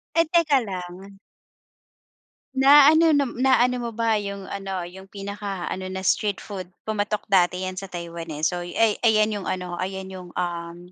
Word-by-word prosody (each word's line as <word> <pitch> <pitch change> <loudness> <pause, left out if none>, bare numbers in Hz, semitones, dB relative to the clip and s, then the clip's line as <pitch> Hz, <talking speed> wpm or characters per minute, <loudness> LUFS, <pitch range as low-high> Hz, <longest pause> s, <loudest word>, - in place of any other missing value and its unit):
Ay 330 - +4
teka 310 -6 +4
lang. 185 +1 -8 1.4
Na 280 +2 +8
ano 320 +1 +6
na 285 -2 +3
na 255 +3 +1
ano 250 +1 +3
mo - - -9
ba 225 0 +1
yung 200 -2 -4
ano, 195 -1 -4
yung 190 +2 -12
pinaka-ano 200 -2 -5
na 190 - -4
street 205 +1 +1
food 185 -3 -8 0.2
pumatok 210 0 -2
dati 185 -1 +2
yan 185 - -5
sa 190 +1 -7
Taiwan 170 -2 -6
eh, 150 +1 -6
so 175 0 -1
ay 210 +5 +1
ayan 215 -1 +4
yung 200 - -5
ano, 180 -1 -3
ayan 190 +1 -4
yung 185 -2 -9
um, 170 -1 -3
195 Hz, 170 wpm, -24 LUFS, 180-220 Hz, 1.4 s, Na